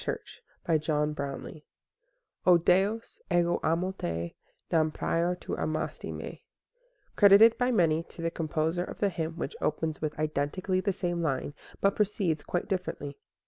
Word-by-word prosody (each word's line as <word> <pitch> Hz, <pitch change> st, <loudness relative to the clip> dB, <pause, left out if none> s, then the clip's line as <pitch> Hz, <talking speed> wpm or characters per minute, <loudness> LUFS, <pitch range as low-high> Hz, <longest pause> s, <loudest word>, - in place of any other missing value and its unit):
Tuesday 160 Hz, -3 st, -3 dB, 0.4 s
Morning 140 Hz, +2 st, -5 dB, 0.8 s
O 180 Hz, -1 st, +7 dB
DEUS, 195 Hz, +6 st, +1 dB
EGO 175 Hz, 0 st, +3 dB
AMO 170 Hz, +4 st, +1 dB
TE, 85 Hz, -, -4 dB, 0.4 s
NAM 160 Hz, -1 st, +3 dB
PRIOR 170 Hz, +3 st, 0 dB
TU -, -, -7 dB
AMASTI 155 Hz, 0 st, -3 dB
ME -, -, -7 dB, 0.7 s
Credited 205 Hz, +3 st, +8 dB
by 250 Hz, 0 st, +2 dB
many 165 Hz, -9 st, +3 dB
to 165 Hz, 0 st, -10 dB
the 165 Hz, -, 0 dB
composer 160 Hz, +2 st, -1 dB
of -, -, -8 dB
the 200 Hz, -, +2 dB
hymn 165 Hz, -2 st, -4 dB
which -, -, -4 dB
opens 155 Hz, +1 st, -1 dB
with 155 Hz, 0 st, -3 dB
identically 155 Hz, +5 st, -1 dB
the 200 Hz, +1 st, +1 dB
same 175 Hz, -2 st, -2 dB
line, 145 Hz, -2 st, -1 dB, 0.3 s
but 195 Hz, 0 st, +3 dB
proceeds 190 Hz, -7 st, 0 dB
quite 175 Hz, -, -2 dB
differently. 160 Hz, -7 st, -3 dB
170 Hz, 140 wpm, -29 LUFS, 155-185 Hz, 0.8 s, Credited